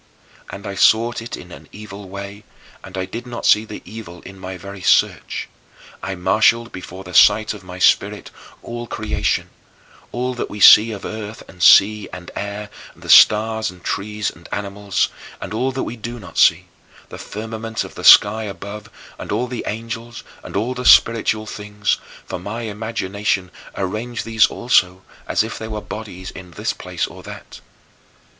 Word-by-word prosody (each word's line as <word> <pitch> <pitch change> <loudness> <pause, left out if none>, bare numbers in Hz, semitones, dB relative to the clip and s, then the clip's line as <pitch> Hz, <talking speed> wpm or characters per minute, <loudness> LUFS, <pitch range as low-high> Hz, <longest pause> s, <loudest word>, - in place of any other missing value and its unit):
And 100 - -9
I 100 - -4
sought 115 +4 +3
it 115 - -6
in 90 - -12
an - - -12
evil 105 -2 -10
way, 100 +2 -8 0.4
and 95 -1 -9
I 95 - -1
did 115 +6 -7
not 120 -1 -6
see 105 +1 +5
the - - -9
evil 105 -6 -10
in 95 0 -12
my 95 0 -7
very 100 +1 -9
search. - - +1 0.5
I 95 - -4
marshaled 110 +5 +2
before 95 +1 -9
the 90 -1 -11
sight 105 +3 +5
of 105 -3 -11
my 90 0 -9
spirit 90 - +2 0.3
all 120 0 -6
creation: - - -2 0.6
all 125 +1 -2
that 120 - -4
we 105 - -8
see 110 +3 +8
of 100 -3 -7
earth 110 0 -7
and 90 -2 -14
sea 105 +3 +6
and 90 -1 -9
air 100 +1 -5 0.2
and - - -3
stars 110 +1 +6
and 90 -1 -14
trees 105 -1 -2
and 85 +1 -16
animals; 100 -1 -1 0.3
and - - -7
all 125 +4 0
that 130 0 -3
we 120 - -6
do 120 +2 -6
not 95 -5 -12
see, - - +5 0.4
the - - -9
firmament 110 +1 -5
of - - -10
the - - -9
sky 110 +2 +7
above 100 +1 -8 0.3
and - - -7
all 125 - 0
the 125 -1 -6
angels 115 +1 -6 0.2
and - - -10
all 115 +6 0
spiritual 110 -3 +5
things, 105 0 -2 0.3
for - - -5
my 105 +6 -5
imagination 105 -3 -2 0.3
arranged 110 +5 -3
these 115 -1 +4
also, 95 -6 +1 0.2
as - - +2
if 110 - -6
they 110 - -6
were 110 -1 -4
bodies, 105 -3 -8
in 90 -1 -11
this 85 - -3
place - - -3
or - - -11
that. - - -11
105 Hz, 175 wpm, -20 LUFS, 95-115 Hz, 0.6 s, see